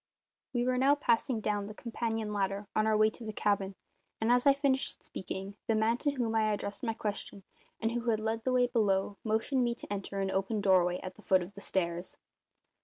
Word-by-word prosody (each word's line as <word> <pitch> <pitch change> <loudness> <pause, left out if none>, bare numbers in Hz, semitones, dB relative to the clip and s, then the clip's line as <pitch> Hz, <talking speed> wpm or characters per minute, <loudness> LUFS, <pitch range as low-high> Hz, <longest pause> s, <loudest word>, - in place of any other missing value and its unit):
We 240 -2 0
were 255 0 +1
now 275 +2 +5
passing 235 -3 +1
down 205 -1 -1
the 210 - -8
companion 225 -2 -3
ladder 200 0 -1
on 215 0 +3
our 215 -1 +3
way 215 0 +5
to 235 - -11
the 220 - -4
cabin, 200 -2 0 0.4
and 220 +2 +2
as 245 +3 +4
I 280 - +8
finished 275 -1 0
speaking 195 +2 -6
the 225 - +2
man 220 +2 +2
to 290 - 0
whom 240 -5 -1
I 215 -1 +3
addressed 205 -1 -3
my 225 -3 -1
question, 205 -2 -4 0.4
and 225 +1 0
who 240 0 -1
had 220 -2 +2
led 220 +1 -2
the 255 - +1
way 250 -1 +4
below, 205 -5 +1
motioned 225 +4 +1
me 240 -1 0
to 205 - -6
enter 195 0 -4
an 195 -1 0
open 195 +3 0
doorway 180 -3 +3
at 185 0 -7
the - - -14
foot 185 -1 +3
of 180 +3 -10
the 200 - -10
stairs. 175 -2 -2
215 Hz, 220 wpm, -31 LUFS, 200-235 Hz, 0.4 s, I